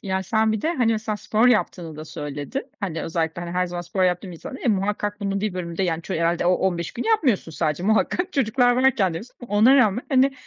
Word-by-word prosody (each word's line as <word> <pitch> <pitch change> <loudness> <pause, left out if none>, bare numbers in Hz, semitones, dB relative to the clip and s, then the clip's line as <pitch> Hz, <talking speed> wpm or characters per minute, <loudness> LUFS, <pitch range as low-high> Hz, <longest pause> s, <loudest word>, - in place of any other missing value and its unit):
Ya, 190 -1 -1
sen 220 +3 +1
bir 220 - -2
de, 330 - +1
hani, 235 -5 +2
mesela 215 -1 -2
spor 220 +3 +1
yaptığını 175 -8 0
da 155 - -7
söyledin. 145 - -5
Hani 165 -5 -3
özellikle, 165 0 -2
hani, 170 - -5
her 180 0 +1
zaman 175 0 -5
spor 185 +2 -1
yaptığım 180 0 -1
insana 215 +10 -8
muhakkak 205 +1 -1
bunun 195 -1 -1
bir 210 -3 -2
bölümde, 170 0 -3
yani, 165 -2 -1
ç - - -12
herhâlde 170 0 +1
o 180 - +5
15 175 -3 -1
günü 240 - -4
yapmıyorsun 280 - +2
sadece. 155 +1 -1
Muhakkak. 220 - +1
çocuklar 245 -1 +2
varken 245 -9 +3
de - - -3
yapıyorsun. 240 - -13
Ona 220 +7 +5
rağmen, 225 -2 +3
hani, 270 0 +3
195 Hz, 220 wpm, -23 LUFS, 175-230 Hz, -, o